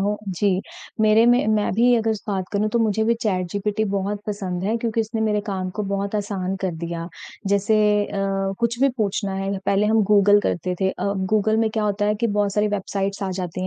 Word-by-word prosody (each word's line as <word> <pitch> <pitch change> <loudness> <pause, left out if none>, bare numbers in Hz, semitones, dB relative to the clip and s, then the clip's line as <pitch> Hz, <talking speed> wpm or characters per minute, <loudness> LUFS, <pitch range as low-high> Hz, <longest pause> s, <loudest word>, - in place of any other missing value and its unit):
हो 205 +1 0
जी। 190 +1 +1 0.4
मेरे 215 +1 +5
में 245 -2 +4
मैं 210 -1 +1
भी 245 +2 +4
अगर 225 0 +1 0.2
बात 190 -2 -1
करूँ, 210 +1 +1
तो 235 - 0
मुझे 220 -1 +1
भी 235 - +3
चैट 185 -4 0
जीपीटी 210 +2 -1
बहुत 200 +1 -2
पसंद 190 -3 -3
है 215 +3 +1
क्योंकि 230 -1 -1
इसने 220 0 -3
मेरे 210 -1 +1
काम 185 -2 -3
को 210 - -1
बहुत 200 +1 -2
आसान 195 -2 -2
कर 190 - 0
दिया। 170 +1 -5 0.4
जैसे 200 +2 +2 0.4
अ, 200 - -3 0.4
कुछ 235 0 0
भी 275 - +5
पूछना 200 -2 -1
है, 195 0 -2
पहले 200 +1 +2
हम 220 0 +3
गूगल 205 0 +6
करते 180 0 -2
थे। 190 - +2
अ, - - -5 0.3
गूगल 215 +1 +3
में 225 0 +2
क्या 215 0 -1
होता 205 0 0
है 210 - +2
कि 230 +2 0
बहुत 205 -2 0
सारी 210 +1 +1
वेबसाइट्स 200 0 -2
आ 190 - -2
जाती 180 +1 -4
205 Hz, 215 wpm, -22 LUFS, 195-220 Hz, 0.4 s, गूगल